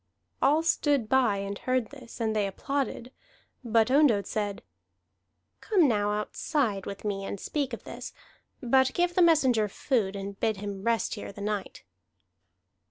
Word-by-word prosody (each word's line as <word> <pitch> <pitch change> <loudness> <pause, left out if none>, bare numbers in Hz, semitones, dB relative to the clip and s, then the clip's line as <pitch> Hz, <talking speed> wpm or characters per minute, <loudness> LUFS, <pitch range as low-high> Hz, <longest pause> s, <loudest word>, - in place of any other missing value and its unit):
All 300 +4 +4
stood 290 -7 +1
by 245 -5 +3
and 200 0 -4
heard 255 -2 -1
this, 255 -5 -12
and 220 -1 0
they 205 -2 +1
applauded. 260 +3 -3 0.5
But 230 0 +2
Ondott 265 -8 +4
said: 205 -2 -3 1.0
"Come 375 -8 +3
now 210 -3 +1
outside 210 0 -1
with 200 +1 -7
me 200 -1 -2
and 195 - -5
speak 280 +3 -2
of 235 - -6
this, - - -8 0.5
but 265 +2 +3
give 350 0 +1
the 365 - +3
messenger 265 -10 +4
food 205 -3 -1
and 200 0 -6
bid 220 -2 0
him 200 -1 -5
rest 230 +2 0
here 205 - -6
the 200 - -10
night." 205 -1 -4
225 Hz, 155 wpm, -28 LUFS, 205-270 Hz, 1.0 s, All